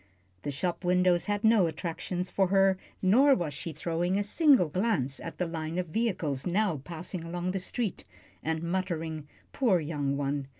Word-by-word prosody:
The - - -4
shop 170 +7 -2
windows 180 -1 +3
had 205 +1 -1
no 220 -5 +5
attractions 175 +2 -4
for 195 -1 +2
her, 195 0 +3 0.2
nor 260 +9 +6
was 165 -5 -3
she 165 +4 -5
throwing 170 +4 -1
a 205 - +1
single 265 - +4
glance 155 - 0
at 165 - -7
the 180 - 0
line 165 0 -4
of 180 -2 -2
vehicles 170 - -1
now 190 -2 +1
passing 170 +4 -6
along 175 +2 -3
the 195 - -2
street; 205 +2 -3 0.4
and 160 +1 -2
muttering, 165 -4 -2 0.3
"Poor 225 -10 +3
young 145 -3 -2
one!" 140 -1 -2
175 Hz, 170 wpm, -29 LUFS, 160-195 Hz, 0.4 s, nor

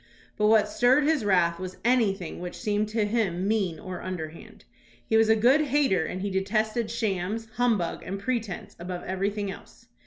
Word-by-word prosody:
But 210 - +2
what 215 -1 +5
stirred 250 +7 +3
his 300 -4 +2
wrath 175 -4 +2
was 185 -1 -6
anything 210 -8 +1
which 180 0 -6
seemed 210 0 -1
to 220 -1 0
him 200 -4 0
mean 195 -7 0
or 185 -1 -7
underhand. 165 -3 -7 0.4
He 220 - 0
was 220 0 +5
a 220 - +6
good 250 +7 +4
hater 270 - +2
and 185 +3 -4
he 200 - -2
detested 215 +4 0
shams, 220 -1 -2
humbug, 225 -8 +1
and 190 +3 -5
pretence 225 -4 -3
above 180 +1 -5
everything 200 +2 -2
else. - - -14
205 Hz, 175 wpm, -27 LUFS, 185-225 Hz, 0.4 s, a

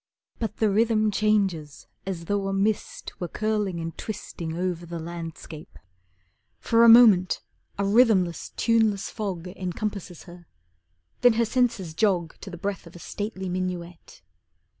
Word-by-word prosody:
But 220 -2 -3
the 215 -2 +2
rhythm 215 0 +2
changes 195 -8 0 0.2
as 175 -3 -4
though 200 +1 -1
a 195 - -2
mist 200 +2 -2
Were 175 - -2
curling 210 -3 -1
and 165 0 -5
twisting 170 -6 -6
Over 180 -1 -2
the 170 0 -5
landscape. 165 -2 -8 0.8
For 230 0 +3
a 235 - +8
moment 215 -6 +6 0.3
a 200 - 0
rhythmless, 200 -5 +3
tuneless 225 -4 +1
fog 190 -5 -4
Encompasses 185 0 -5
her. 175 -2 -14 0.7
Then 245 -1 +6
her 230 +1 +2
senses 230 -8 0
jog 175 -3 +1
To 195 - -8
the 175 - -8
breath 195 0 -4
of 170 - -15
a - - -10
stately 205 0 -5
minuet. 180 -2 -5
195 Hz, 140 wpm, -25 LUFS, 175-215 Hz, 0.8 s, a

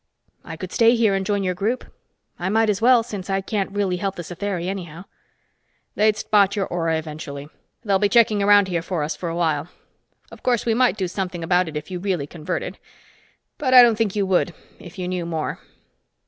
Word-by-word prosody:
"I 165 - -8
could 185 +1 -7
stay 230 0 +4
here 225 -4 +3
and 195 0 0
join 200 0 -1
your 185 -1 0
group. 215 +7 -2 0.5
I 175 +2 -2
might 220 +1 +3
as 200 +1 -3
well, 240 0 +5
since 205 -5 -7
I 195 0 +1
can't 195 0 -2
really 195 -2 -1
help 195 +1 -3
the 175 - -6
Satheri 180 +1 -4
anyhow." 175 -2 -6 0.9
"They'd 215 0 +2
spot 200 -2 +2
your 200 -2 0
aura 165 -2 -1
eventually. 150 -2 -7 0.3
They'll 200 -3 +2
be 205 0 +2
checking 215 -2 +4
around 205 -1 +5
here 175 -3 -1
for 170 -2 -3
us 150 +1 -3
for 170 +3 -5
a 165 - -4
while. 160 -3 0 0.6
Of - - -13
course, 245 -3 +1
we 230 - +2
might 245 -1 +2
do 190 -3 -1
something 180 -2 -4
about 180 +1 +2
it, 155 - -5
if 150 - -7
you 180 - -4
really 180 -6 -1
converted. 155 +1 -5 0.8
But 260 -3 +2
I 250 - +11
don't 235 -2 +4
think 215 -3 -1
you 200 -1 +1
would, 180 -3 +1 0.2
if 175 +1 -12
you 180 -1 -3
knew 180 -1 -2
more." 165 -2 -3
190 Hz, 210 wpm, -22 LUFS, 170-210 Hz, 0.9 s, I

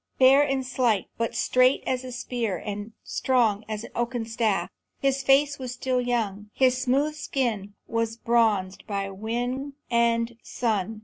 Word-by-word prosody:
Fair 265 +2 +7
and 270 -2 0
slight, 245 -5 +1
but 230 - -1
straight 255 +1 +3
as 255 0 -1
a 255 - -7
spear 240 -5 -2
and 205 +2 -6
strong 225 -5 +1
as 215 0 -3
an - - -9
oaken 240 -1 -2
staff. 225 -3 0 0.3
His 275 0 +1
face 275 +2 +3
was 255 -2 -4
still 250 0 0
young; 215 -4 -2
the 260 -1 +5
smooth 260 +4 +1
skin 235 -9 -2
was 230 0 -1
bronzed 220 -6 +1
by 200 -2 -2
wing 245 +7 -3 0.2
and 235 0 +2
sun. 220 -2 -2
235 Hz, 150 wpm, -26 LUFS, 220-255 Hz, 0.3 s, Fair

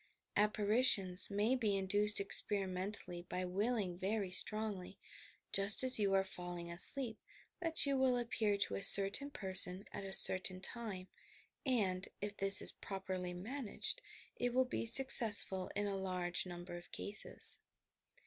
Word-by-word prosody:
Apparitions 210 -2 +3
may 210 +4 -2
be 215 -6 -2
induced 205 +2 +1
experimentally 195 -2 0
by 185 0 -4
willing 195 -1 -4
very 195 0 -4
strongly, 200 -1 +1 0.5
just 200 +5 +4
as 255 -3 +4
you 200 -2 -1
are 195 - +1
falling 175 -2 -9
asleep 225 +6 -1 0.4
that 330 -3 +3
you 280 -1 -2
will 260 -2 0
appear 225 -4 -3
to 200 - -3
a - - -5
certain 200 +7 +5
person 190 -4 -1
at - - -9
a 195 - -9
certain 185 -1 +5
time, 195 -2 -7 0.6
and, 195 -7 -2
if 205 0 -7
this 195 0 +6
is - - +6
properly 185 -2 -8
managed, 245 - -4 0.4
it 245 0 -4
will 260 0 +1
be 250 - -6
successful 225 -7 +4
in 205 - -3
a 200 -1 -4
large 180 -1 -5
number 175 0 -10
of 175 0 -13
cases. 205 +1 -4
200 Hz, 140 wpm, -34 LUFS, 185-225 Hz, 0.6 s, this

